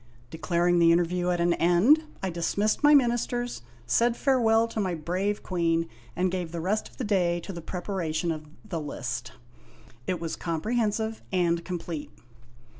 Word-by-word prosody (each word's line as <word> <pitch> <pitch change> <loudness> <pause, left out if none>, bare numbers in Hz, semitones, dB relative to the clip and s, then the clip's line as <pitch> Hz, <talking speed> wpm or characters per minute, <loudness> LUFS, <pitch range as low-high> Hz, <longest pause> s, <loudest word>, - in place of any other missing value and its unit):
Declaring 175 +1 +1
the 165 0 +6
interview 175 +1 +1
at 175 -1 +1
an 170 0 +3
end, 185 - +4 0.2
I 190 - -1
dismissed 200 +5 0
my 295 0 +7
ministers, 240 - +1 0.2
said 235 - +2
farewell 230 -4 +3
to 225 - -4
my 185 -4 0
brave 185 +6 -2
queen, 165 -2 0 0.3
and 180 +1 +1
gave 180 -3 -3
the 170 - -4
rest 195 +6 -1
of - - -22
the - - -3
day 180 -5 +1
to 195 - -7
the 170 - -6
preparation 175 -2 -2
of 155 -1 -6 0.2
the 175 -6 -4
List. 145 - -5 0.7
It 185 - -1
was 165 -1 -3
comprehensive 220 +5 -1
and 170 -2 +1
complete. 170 -4 -5
180 Hz, 160 wpm, -27 LUFS, 170-215 Hz, 0.7 s, my